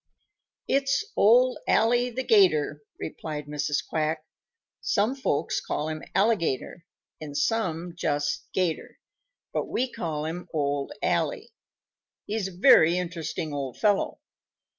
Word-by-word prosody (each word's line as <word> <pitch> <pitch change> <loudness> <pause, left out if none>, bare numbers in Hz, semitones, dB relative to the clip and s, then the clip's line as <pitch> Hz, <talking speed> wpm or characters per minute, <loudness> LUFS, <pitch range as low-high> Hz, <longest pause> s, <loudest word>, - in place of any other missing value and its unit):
"It's 275 +3 +2
Old 245 +4 +5
Ally 245 +2 +3
the 255 +2 -3
'Gator," 155 - +3 0.2
replied 155 -2 -5
Mrs. 145 0 -2
Quack. 155 0 -1 0.6
"Some 215 +4 +1
folks 265 - -1
call 150 +1 -2
him 155 0 -4
Alligator 190 - 0 0.3
and 145 -2 -5
some 175 -2 -1
just 145 -4 -1
'Gator, 180 -4 -2 0.6
but - - -1
we 255 0 -1
call 155 -8 -3
him 175 +3 -5
Old 145 -2 -1
Ally. 485 -3 0 0.8
He's 210 -2 -2
a 185 -2 -11
very 175 -6 +6
interesting 165 -3 -4
old 135 -3 -4
fellow. 205 -2 +1
170 Hz, 120 wpm, -26 LUFS, 150-225 Hz, 0.8 s, very